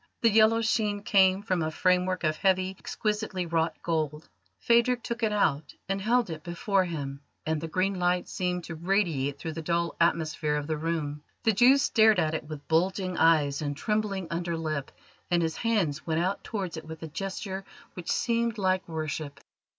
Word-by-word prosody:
The 230 - +4
yellow 220 +1 +5
sheen 210 -2 0
came 190 -1 +4
from 185 -4 0
a 155 - 0
framework 180 +2 +1
of 155 -1 +1
heavy, 190 0 +1
exquisitely 210 -4 -2
wrought 165 -1 0
gold. 155 -2 -2 0.3
Phadrig 235 - +3
took 235 0 -4
it 220 -2 +2
out 160 -8 0
and 195 0 -1
held 235 -1 +2
it 155 -1 -6
before 185 +3 0
him, 140 -5 -5 0.2
and 160 -1 -1
the 165 - -4
green 185 +5 0
light 180 0 +1
seemed 180 -1 -2
to 170 - -7
radiate 165 -6 0
through 160 +3 -5
the 165 +1 -5
dull 170 +1 -1
atmosphere 155 -2 +1
of 150 -1 -2
the 155 +1 -1
room. 150 -2 -3 0.2
The 225 - +3
Jew 245 +7 +6
stared 220 -6 +4
at 160 -3 +1
it 155 - -3
with 150 -2 -9
bulging 185 +3 +1
eyes 155 -4 +3
and 145 -1 -3
trembling 210 -1 -1
under 170 0 -2
lip, 155 -4 -3 0.4
and 175 -1 +2
his 160 -1 -2
hands 200 -11 0
went 160 -1 0
out 185 +3 -1
towards 190 -6 -4
it 160 - -7
with 160 0 -9
a - - -4
gesture 190 +3 -5 0.3
which 180 - -4
seemed 235 -1 0
like 185 -2 +1
worship. 155 -3 -4
175 Hz, 185 wpm, -28 LUFS, 160-200 Hz, 0.4 s, Jew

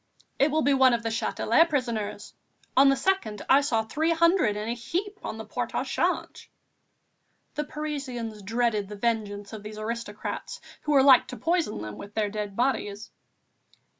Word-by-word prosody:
"It 280 - +4
will 310 +1 +1
be 285 - +4
one 260 -2 +5
of 230 - -5
the 225 - -1
Châtelet 230 +7 +2
prisoners. 230 -7 -2 0.4
On 275 +1 +7
the 275 - +4
2nd 265 - -1
I 275 - +6
saw 235 -6 +1
three 310 +9 -1
hundred 335 - +3
in 210 +1 -4
a 230 - 0
heap 360 - -4
on - - -5
the - - -7
Port - - -4
au - - +1
Change." - - -2 1.0
The 300 - -2
Parisians 270 -8 -5
dreaded 220 0 0
the 210 - -6
vengeance 205 -2 -2
of 215 - -6
these 210 +1 -8
aristocrats 215 -1 -5 0.2
who 300 - 0
were 270 -2 +6
like 265 -3 +7
to 250 - -7
poison 330 - 0
them 105 -1 -7
with 200 +1 -10
their 215 -2 +1
dead 205 -1 -4
bodies. 220 -4 -1
235 Hz, 175 wpm, -27 LUFS, 210-285 Hz, 1.0 s, On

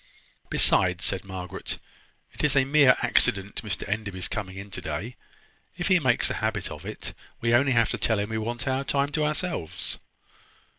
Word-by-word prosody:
"Besides," 90 -1 +4
said 95 -1 0
Margaret, 95 -2 -5 0.6
"it - - -6
is 150 -2 +3
a 135 -1 +4
mere 140 -2 +6
accident 100 -4 +2
Mr 105 -3 -3
Enderby's 100 -3 -2
coming 95 -3 -5
in 100 +1 -8
to 95 - -5
day. 90 +9 -5 0.6
If 175 +1 -1
he 185 -2 +5
makes 130 -6 +3
a - - -4
habit - - -1
of - - -8
it, - - -6 0.3
we 115 0 0
have 120 - +6
only 135 0 +2
to 115 -1 +2
tell 110 - +1
him 100 +1 -2
that - - -5
we 110 - -1
want 120 +5 -4
our 130 +1 0
time 140 0 0
to 155 0 0
ourselves." 150 - -2
115 Hz, 190 wpm, -26 LUFS, 95-140 Hz, 0.6 s, mere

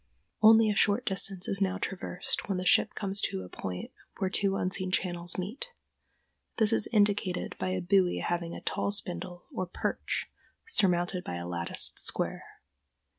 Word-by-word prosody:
Only 220 0 +7
a - - -1
short 210 +6 +3
distance 190 -2 0
is 195 0 0
now 195 0 +1
traversed 190 0 -4
when 195 - +1
the 180 - -3
ship - - +4
comes 200 -1 -1
to 95 - -1
a 90 - -10
point 90 0 -5 0.3
where 190 -2 -1
two 195 -1 +1
unseen 185 0 0
channels 175 -2 -1
meet. 210 - -4 0.9
This 220 -3 +3
is - - +1
indicated 205 -4 +1
by - - -1
a 185 0 -1
buoy 180 0 +3
having 170 -1 -2
a - - -7
tall - - -1
spindle, 180 -3 -4
or 185 - -2
"perch," - - -2 0.4
surmounted 180 - +3
by 90 - -4
a 85 0 -5
latticed 85 -1 -1
square. - - -2
185 Hz, 165 wpm, -30 LUFS, 175-200 Hz, 0.9 s, Only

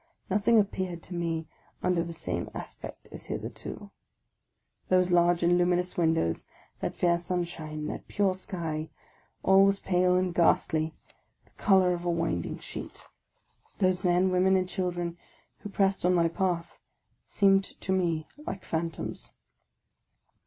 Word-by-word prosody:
Nothing 210 +3 +4
appeared 185 -4 -2
to 180 - -9
me 165 -2 -2 0.4
under 180 -2 +2
the 170 0 -4
same 165 0 -3
as - - -5
pect - - -10
as - - -7
hitherto. 205 -1 -6 1.0
Those 185 -1 +3
large 175 0 +4
and 175 +1 +4
luminous 180 0 +1
windows, 160 - +1 0.3
that - - -3
fair 170 -1 +2
sunshine, 170 -4 -3
that - - -5
pure 200 -2 +1
sky, 165 -4 -4 0.3
— - - -37
all 190 +1 +6
was 195 0 +3
pale 180 -1 +2
and 185 -1 0
ghastly, 160 -2 +2 0.5
the - - -28
colour 190 -3 +4
of 175 0 -4
a 175 - -1
winding 165 - -1
sheet. - - -8 0.7
Those 185 -1 +1
men, 180 +1 +3
women, 185 +1 +4
and 185 -1 +1
children 175 -2 -3 0.4
who 205 - -7
pressed 195 -1 +1
on 180 +1 +4
my 170 -1 +4
path 175 -1 -2 0.5
seemed 195 -1 +4
to 190 - -6
me 170 -4 0 0.2
like 190 -1 -5
phantoms. 165 0 -3
180 Hz, 145 wpm, -28 LUFS, 170-185 Hz, 1.0 s, all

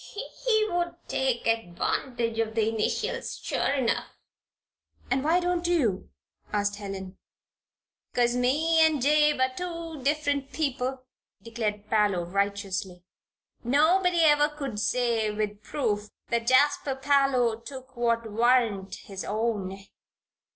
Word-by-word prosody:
He 440 -3 +3
would 345 -2 -1
take 260 -3 -1
advantage 230 +3 -1
of 220 -1 -1
the 220 -1 +2
initials, 225 - -2
sure - - -1
enough." 260 -4 0 1.0
"And 265 0 +1
why 325 +4 +3
don't 355 -1 0
you?" 255 - +1 0.4
asked 205 -1 0
Helen. 195 -2 -7 0.9
"'Cause 240 0 +2
me 300 +7 +2
and 315 -2 +3
Jabe 300 +2 +3
are 260 0 +2
two 335 -2 -5
different 285 0 -1
men," 270 -3 -1 0.5
declared 215 -3 -3
Parloe, 205 -5 +2
righteously. 195 -1 -2 0.6
"Nobody 340 +7 +3
ever 295 -1 +5
could 275 -8 -5
say, 230 -1 +1
with 210 -1 -3
proof, 215 -5 -2 0.2
that 235 0 -1
Jasper 280 +1 +3
Parloe 265 -4 +2
took 260 +2 -10
what 235 -1 +1
warn't 230 -4 +2
his 195 -1 -7
own." 205 -3 -2
245 Hz, 115 wpm, -27 LUFS, 210-295 Hz, 1.0 s, ever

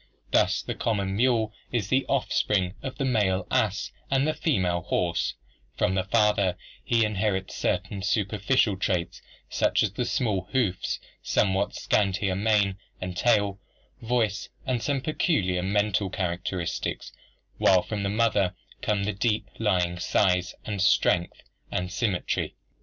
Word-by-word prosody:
Thus - - +3
the - - -3
common 100 -4 -1
mule 115 -2 +2 0.2
is 110 -5 -1
the 130 +1 +2
offspring 100 -8 +1
of 135 -1 -6
a 135 - +1
male 105 -6 +1
ass 105 -2 +1 0.2
and 140 +3 +2
female 90 - +1
horse; 85 -1 -1 0.4
from 90 - +2
the 95 -1 +1
father 100 -3 +2 0.3
he 115 -2 +3
inherits 100 -2 -1
certain 100 -2 -1
superficial 105 +1 +1
traits 90 -3 -1 0.3
such - - +2
as 105 - 0
the 120 +5 -2
small 100 -9 0
hoofs, 105 -9 0 0.2
somewhat 95 0 +1
scantier 100 -1 +1
mane 100 -1 +2 0.2
and 90 -1 -5
tail, 100 -2 +2 0.4
voice, 115 -3 0 0.2
and 125 -3 0
some 140 0 0
peculiar 100 - +1
mental 100 +1 +1
characteristics; 90 -1 -3 0.5
while 95 -2 +5
from 105 -2 -4
the 100 - -1
mother 105 -4 +2 0.3
come 105 -2 0
the 105 +1 -1
deeper 105 +2 -1
lying 90 -5 +1
size 90 -1 +1
and 105 -3 -3
strength 90 -3 +2 0.3
and 90 0 -2
symmetry. 100 -3 -1
100 Hz, 135 wpm, -26 LUFS, 95-110 Hz, 0.5 s, while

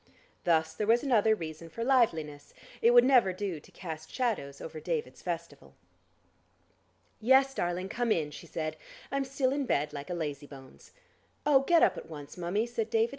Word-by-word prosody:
Thus 160 -1 +2
there 210 +5 -3
was 235 +2 +4
another 220 -5 +4
reason 165 -2 -7
for 230 +8 -5
liveliness; 165 - +1 0.3
it 230 - +6
would 240 0 +7
never 250 -7 +5
do 185 -3 -4
to - - -19
cast 160 -3 -8
shadows 210 - -2
over 160 -1 -7
David's 155 -6 -3
festival. 170 -1 -6 1.4
"Yes, 265 +4 +4
darling, 175 -4 -2
come 235 +3 -1
in," 155 -6 +1
she 160 +3 -10
said. 155 -1 -4 0.3
"I'm 275 0 0
still 265 -1 0
in 280 -2 -2
bed 150 -3 0
like 145 +2 -7
a 180 - -2
lazy 145 -3 -4
bones." 135 -2 -14 0.5
"Oh, 290 -2 +6
get 330 +5 +4
up - - +3
at - - -13
once, 145 -3 -9
mummie," 180 +5 -1
said 230 -2 -3
David. 225 +1 +2
180 Hz, 175 wpm, -30 LUFS, 155-240 Hz, 1.4 s, would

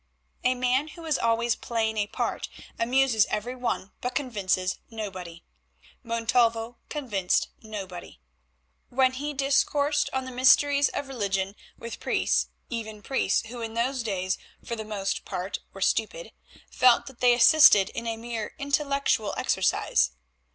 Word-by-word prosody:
A 255 0 +3
man 255 +3 +1
who 330 +2 -11
is 310 -3 0
always 230 0 +1
playing 220 -2 -2
a 205 -1 +1
part - - -3 0.3
amuses 245 -2 +3
every 225 +4 -3
one 240 -6 -3
but 250 0 -3
convinces 190 -7 -1
nobody. 185 -7 -7 0.6
Montalvo 230 0 +1
convinced 210 - 0
nobody. 195 - -8 0.7
When 260 +1 +3
he 290 +3 -3
discoursed 285 +2 +2
on 265 0 -2
the 260 - -7
mysteries 280 +3 +4
of 285 - -4
religion 200 -6 -2 0.2
with 230 0 -7
priests, - - +1 0.2
even 220 -3 -6
priests 235 -5 0
who 240 0 -7
in 225 0 -5
those 255 +3 0
days 190 -4 -2 0.3
for 235 - -3
the 220 - -5
most 200 -2 -3
part 185 +3 -4
were - - -11
stupid, - - 0 0.4
felt 250 -2 +4
that 265 -3 -12
they 245 -1 +5
assisted 230 -6 +7
in 230 0 -6
a 225 -1 -2
mere 230 -2 -5
intellectual 280 -6 0
exercise. 65 0 +1
235 Hz, 140 wpm, -26 LUFS, 210-265 Hz, 0.7 s, assisted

